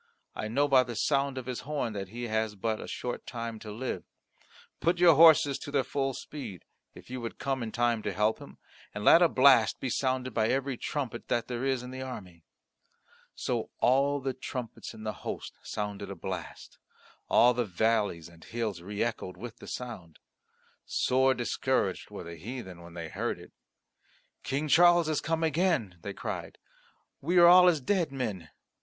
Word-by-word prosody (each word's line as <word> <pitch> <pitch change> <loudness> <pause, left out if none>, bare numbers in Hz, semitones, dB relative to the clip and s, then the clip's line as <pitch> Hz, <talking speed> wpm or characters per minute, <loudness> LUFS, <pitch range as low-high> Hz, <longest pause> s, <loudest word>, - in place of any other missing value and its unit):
I 110 - -4
know 140 +7 +2
by 135 -2 +6
the 120 -2 -5
sound 140 +1 +1
of 130 - -5
his 125 -1 -4
horn 140 -6 -3
that 100 -2 -4
he 120 +4 -7
has 110 -2 -1
but 110 +2 -2
a - - -7
short 125 - -5
time 115 -2 -5
to 105 - -8
live. 125 +5 -4 0.8
Put 170 +2 +2
your 175 -1 +7
horses 150 -3 +6
to - - -8
their 140 -2 +1
full 135 0 -2
speed, 135 - -8 0.3
if - - -13
you 130 -1 -4
would 115 - -6
come 135 -2 -2
in 115 -2 -4
time 120 -1 +1
to 105 - -2
help 105 +3 +1
him, - - -12 0.4
and 105 - -4
let 170 - +8
a 175 - +6
blast 130 -4 +5
be 130 - -3
sounded 130 -1 -1
by 110 0 +2
every 135 +1 0
trumpet 120 -2 -4
that 120 - 0
there 125 0 -4
is 135 -2 0
in 125 - -8
the 130 0 -6
army." 95 -10 -8 0.9
So - - -2
all 140 +3 +3
the 135 -1 -2
trumpets 125 -2 -6
in 110 - -10
the 110 -1 -2
host - - -5
sounded 100 -1 -5
a 100 - -5
blast; 90 0 -7 0.5
all 125 +1 +6
the 120 0 0
valleys 105 -3 0
and 85 -1 -17
hills 110 -6 -3
re 100 +4 -2
echoed 115 -5 -4
with 120 -2 -8
the - - -12
sound; 105 -10 -7 0.7
sore 130 +1 +2
discouraged 120 0 -1
were - - -7
the 85 0 -9
heathen 95 - -7
when 85 0 -12
they 85 -2 -6
heard - - -2
it. - - -14 0.9
"King 140 +3 -2
Charles 175 +2 +6
has 155 -2 0
come 165 +1 -1
again," 160 - +1
they - - -5
cried; - - -5 0.6
"we 175 +6 +1
are 175 - +9
all 180 +1 +9
as 170 -4 +4
dead 170 +2 0
men. 105 - -4
125 Hz, 185 wpm, -29 LUFS, 105-140 Hz, 0.9 s, are